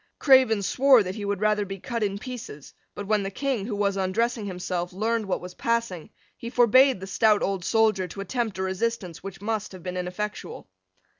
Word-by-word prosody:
Craven 260 -7 +5
swore 260 +2 +5
that 185 0 -4
he 205 0 -6
would 200 -1 -2
rather 210 -1 +2
be 195 0 -7
cut 235 +4 -4
in 200 -1 -1
pieces: 220 - -9 0.2
but, 205 - -5
when 215 0 +1
the 195 - -3
King, 235 -1 -2
who 220 - -3
was 200 -1 0
undressing 215 +4 -1
himself, 180 -1 -3
learned 220 +3 -1
what 190 - -1
was 180 0 -8
passing, 230 -8 -2 0.3
he 235 - -7
forbade 250 0 +5
the 190 - -7
stout 210 +2 +2
old 195 -2 -1
soldier 215 -2 +2
to 195 +3 -7
attempt 225 +1 -2
a 190 - -2
resistance 190 -2 -3
which 195 -1 -9
must 215 -2 -3
have 185 -2 -11
been 185 0 -4
ineffectual. 180 +4 -5
205 Hz, 200 wpm, -25 LUFS, 190-230 Hz, 0.3 s, Craven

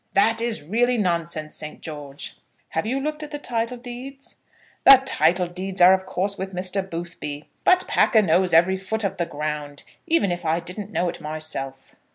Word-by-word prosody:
"That 225 +3 +3
is 235 -8 -1
really 240 +9 +1
nonsense, 170 -5 -1
Saint 150 0 -7
George." 145 -3 -8 0.3
"Have 160 +5 -2
you 260 +4 0
looked 305 +2 -3
at 300 - -6
the 295 - -5
title 240 -3 -2
deeds?" 255 +3 -9 0.5
"The 270 -1 +10
title 175 - +3
deeds 185 +2 -4
are 180 +1 +8
of 190 0 -1
course 195 +2 -1
with 190 0 -5
Mr. 185 +2 -1
Boothby. 165 -5 -7 0.2
But 365 0 +4
Packer 220 -3 +4
knows 180 +1 +3
every 175 +3 +4
foot 215 +4 -2
of 195 -1 -2
the 170 - -1
ground, 150 -2 -4 0.2
even 320 - +2
if 175 0 -3
I 160 +1 +1
didn't 185 +4 -5
know 175 0 0
it - - -5
myself." 150 -3 -4
185 Hz, 185 wpm, -23 LUFS, 160-225 Hz, 0.5 s, The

